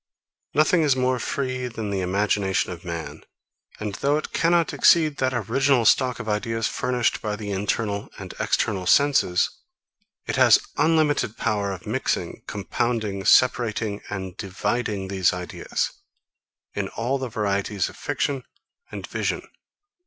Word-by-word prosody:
39. - - +2
Nothing 165 +2 +4
is 145 -4 +3
more 130 -1 +1
free 130 0 -2
than 110 -3 -5
the 95 -1 -1
imagination 95 +1 0
of 85 -1 -8
man; 85 -2 -6 0.6
and 105 -1 -3
though 145 +2 +3
it 155 - -5
cannot 170 0 +2
exceed 155 -4 +4
that 130 0 +1
original 125 +2 +2
stock 125 +2 +3
of 120 - -6
ideas 115 +1 -1
furnished 125 -2 0
by 105 -1 -2
the 105 -1 -5
internal 100 +1 -1
and - - -8
external 95 -4 0
senses, 135 -9 +3 0.7
it - - -2
has - - +7 0.2
unlimited 155 -8 +2
power 105 -3 0
of 95 - -7
mixing, - - -2
compounding, 105 0 -2
separating, 110 -4 +3
and 95 -3 -5
dividing 100 +1 -2
these 95 -2 +2
ideas, 90 -1 -3 0.8
in - - -2
all 125 +5 -2
the 130 -1 -4
varieties 100 -2 -1
of - - -10
fiction 135 -3 -2 0.5
and - - -6
vision. - - -3
110 Hz, 140 wpm, -24 LUFS, 100-130 Hz, 0.8 s, has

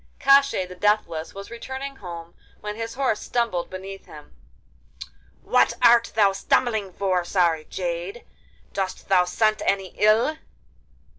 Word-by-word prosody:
Koshchei 275 -8 +4
the 180 - -9
Deathless 180 -5 0
was 200 +3 -9
returning 265 +3 -6
home 170 -4 -9 0.3
when 210 0 -5
his 225 +1 -5
horse 260 -5 0
stumbled 230 -8 -1
beneath 195 +1 -8
him. - - -13 1.1
'What - - +3
art 235 0 +5
thou 205 -3 +5
stumbling 205 +1 0
for, 185 -1 0
sorry 170 -3 +1
jade? 175 +5 -5 0.5
Dost 190 -1 -4
thou 180 -2 +4
scent 215 +4 +1
any 195 -2 -1
ill? 225 +9 +3
200 Hz, 130 wpm, -24 LUFS, 180-230 Hz, 1.1 s, art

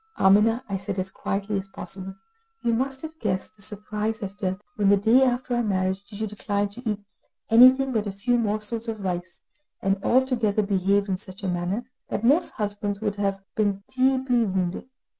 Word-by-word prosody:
"Amina," 210 +5 +4
I 195 - -2
said, 195 0 -5
as 190 0 -2
quietly 200 +1 -2
as 190 - -8
possible, 190 0 -7 0.5
"you 235 - +2
must 265 +3 -1
have 320 0 -8
guessed 195 0 -2
the 210 - -18
surprise 210 +2 -2
I 195 - -2
felt, 190 0 -4
when 205 -2 +2
the 200 - +6
day 225 +6 +5
after 250 -1 +1
our 240 - +2
marriage 190 -2 0
you 215 +1 -4
declined 205 -1 -2
to 235 +4 -10
eat 210 -1 -2 0.5
anything 255 +3 +7
but 220 -3 0
a - - -2
few 240 +5 +1
morsels 215 +1 -1
of 220 -2 -4
rice, 180 -2 -4 0.4
and 195 0 0
altogether 235 -5 +2
behaved 200 0 +2
in 190 -2 0
such 190 +1 -10
a - - -1
manner 180 +6 -1 0.2
that 215 - -2
most 290 +9 +3
husbands 205 -1 -2
would 205 -2 -2
have 195 -1 -1
been 200 -2 0
deeply 260 -2 +3
wounded. 190 +3 -2
205 Hz, 185 wpm, -25 LUFS, 195-230 Hz, 0.5 s, anything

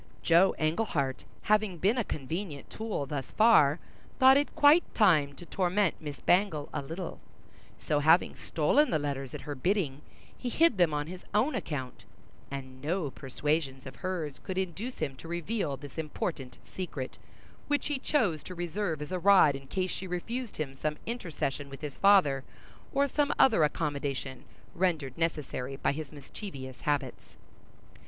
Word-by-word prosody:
Joe 170 +3 +5
Englehart 155 - -1 0.2
having 215 -3 +2
been 205 +9 +2
a - - +2
convenient 155 0 -5
tool 220 -10 -3
thus 140 -2 -5
far 175 -10 +6 0.4
thought 265 0 +8
it 285 +1 +1
quite 295 +4 +5
time 155 -10 +4
to 140 - -12
torment 185 +1 +1
Miss 145 -2 -6
Bangle 175 -6 +2
a - - -1
little; 165 +5 -6 0.6
so, 150 - 0
having 160 +4 +4
stolen 250 - +2
the 155 - +2
letters 140 -3 -3
at - - -6
her 150 - -5
bidding, 150 -2 0 0.3
he 250 - -4
hid 315 - +3
them 175 -3 +5
on 145 0 -1
his 180 +3 -9
own 255 +8 +3
account, 145 - -4 0.4
and 130 -1 -7
no 155 0 -1
persuasions 135 0 -2
of 130 - -9
hers 175 -7 -4
could 185 - -4
induce 190 +7 -3
him 135 - -3
to 165 - -10
reveal 170 -3 -2
this 145 +2 -9
important 150 -3 -4
secret, 155 -8 -6 0.5
which 290 0 +1
he 295 -3 -1
chose 215 - +1
to 185 - -8
reserve 175 -2 -2
as 150 - -9
a 185 - -1
rod 185 -6 +6
in 135 0 -9
case 185 +4 -1
she 190 - -5
refused 225 +7 -4
him 145 -3 -3
some 150 +2 -2
intercession 155 - -3
with 135 - -10
his 150 -3 -6
father, 180 -10 +5 0.5
or 280 0 +2
some 290 +1 +1
other 220 -11 +5
accommodation, 140 -4 -2 0.3
rendered 160 -8 0
necessary 145 -5 -2
by 135 - 0
his 155 +1 -6
mischievous 140 - -9
habits. 145 -3 -2
160 Hz, 160 wpm, -30 LUFS, 140-200 Hz, 0.6 s, thought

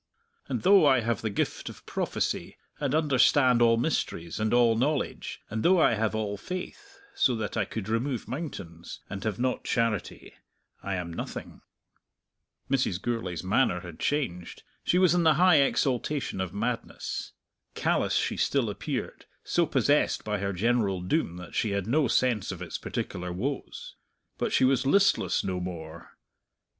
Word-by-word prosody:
_ - - -1
"_'And - - -3
though 195 0 +7
I 130 -3 +5
have 115 -2 -1
the 110 - -1
gift 100 - -2
of - - -13
prophecy, - - -2 0.2
and 145 -1 0
understand 130 -4 +4
all 115 -1 +5
mysteries, 95 - -2
and 110 0 0
all 120 -2 +4
knowledge; 140 +5 -1
and 110 +1 -3
though 180 +5 +4
I 155 - +5
have 110 0 0
all 105 -2 -2
faith, 185 - -7 0.2
so 125 - +2
that 110 -2 -4
I 110 -3 +1
could 110 -1 -5
remove 115 +3 -1
mountains, 105 - -7
and 100 0 -5
have 105 -3 -2
not 125 +1 -1
charity, 115 -4 -2 0.5
I 100 -1 -3
am 85 -2 -4
nothing.'_" - - -7 1.1
Mrs. 130 -9 0
Gourlay's 100 -8 -3
manner 95 -1 +2
had 85 -3 -10
changed: 125 - -2 0.2
she 180 - +2
was 185 -2 +5
in 180 - +3
the 160 -3 +5
high 175 -2 +6
exaltation 135 -4 0
of 95 -2 -3
madness. 115 +3 -4 0.4
Callous - - +1
she - - 0
still - - +1
appeared, - - -5 0.2
so 170 -2 +1
possessed 145 0 +2
by 105 -1 -2
her 100 +1 -1
general 100 -1 +1
doom 90 - -1
that 90 -1 -10
she 105 -3 0
had 100 -2 -1
no 140 +5 +2
sense 120 -3 +1
of - - -6
its - - -5
particular 90 0 -4
woes. 130 +10 -5 0.4
But - - -1
she - - +3
was 135 0 +2
listless 165 - +3
no 90 -1 -2
more. 85 -2 -8
115 Hz, 165 wpm, -28 LUFS, 95-140 Hz, 1.1 s, though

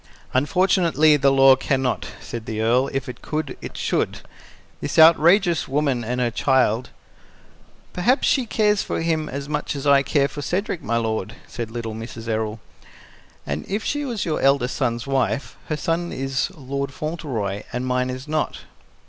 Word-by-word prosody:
"Unfortunately 160 +1 +3
the 140 -1 +3
law 135 0 +7
can 135 0 0
not," 125 - -1
said 115 -2 -7
the 110 -1 -3
Earl. 120 +4 +3
"If 135 -2 -3
it 125 - -8
could, 155 0 -3
it - - -8
should. - - -1 0.6
This - - -4
outrageous 170 +2 +5
woman 135 -3 0
and 125 +3 -2
her 120 -2 +1
child 125 -1 +2 0.5
" - - -30
"Perhaps 240 +10 +2
she 260 -4 +2
cares 210 -2 +2
for - - -3
him 160 -2 0
as 140 +1 -5
much 150 0 -2
as 140 0 -5
I 140 -1 +6
care 140 0 +2
for 145 - -7
Cedric, 180 +4 -2
my 115 +2 -1
lord," 110 -4 -2
said 115 -2 -6
little 115 -1 -5
Mrs. 115 +1 -8
Errol. 110 -1 -2 0.9
"And 70 +1 -3
if 205 +3 -2
she 290 0 -1
was 240 -7 -3
your 160 -3 -1
eldest 135 -2 +2
son's 120 -3 -1
wife, 135 -2 -1
her 155 - -2
son 165 +3 -1
is 135 -1 -1
Lord 140 0 -4
Fauntleroy, 130 - -3
and 125 +1 -3
mine 125 0 0
is 130 +2 -6
not." 155 0 -2
135 Hz, 175 wpm, -22 LUFS, 120-155 Hz, 0.9 s, law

